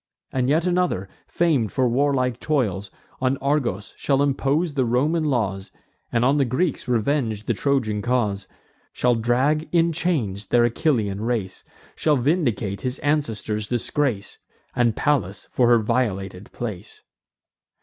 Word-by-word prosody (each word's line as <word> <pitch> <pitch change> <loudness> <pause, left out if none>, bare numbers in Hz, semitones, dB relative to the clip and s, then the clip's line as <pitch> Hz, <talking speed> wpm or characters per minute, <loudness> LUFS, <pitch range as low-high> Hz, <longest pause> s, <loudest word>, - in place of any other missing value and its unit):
And 130 0 0
yet 160 +4 +2
another, 180 - 0 0.2
fam'd 145 - +1
for 130 -1 +1
warlike 125 -1 +1
toils, 105 - -1 0.3
On 130 +1 +1
Argos 135 -8 -1
shall 140 0 +1
impose 145 +4 0
the 135 -2 +1
Roman 145 +7 +1
laws, 100 -9 -1 0.4
And 120 +1 +2
on 140 +3 +3
the 140 - +4
Greeks 135 +6 -1
revenge 115 -3 0
the 120 - +1
Trojan 115 -4 0
cause; 105 -5 0 0.5
Shall 125 0 +2
drag 130 +7 +1
in 170 -1 +3
chains 135 - -1
their 120 -1 +4
Achillean 115 -7 0
race; 110 -5 -2 0.3
Shall 150 -2 +2
vindicate 120 - 0
his 130 +1 -2
ancestors' 110 -8 -1
disgrace, 120 -2 -2 0.4
And 120 -3 +2
Pallas, 115 -10 0
for 125 - +3
her 120 0 +6
violated 105 -5 -2
place. 110 -7 -7
125 Hz, 135 wpm, -23 LUFS, 110-145 Hz, 0.5 s, her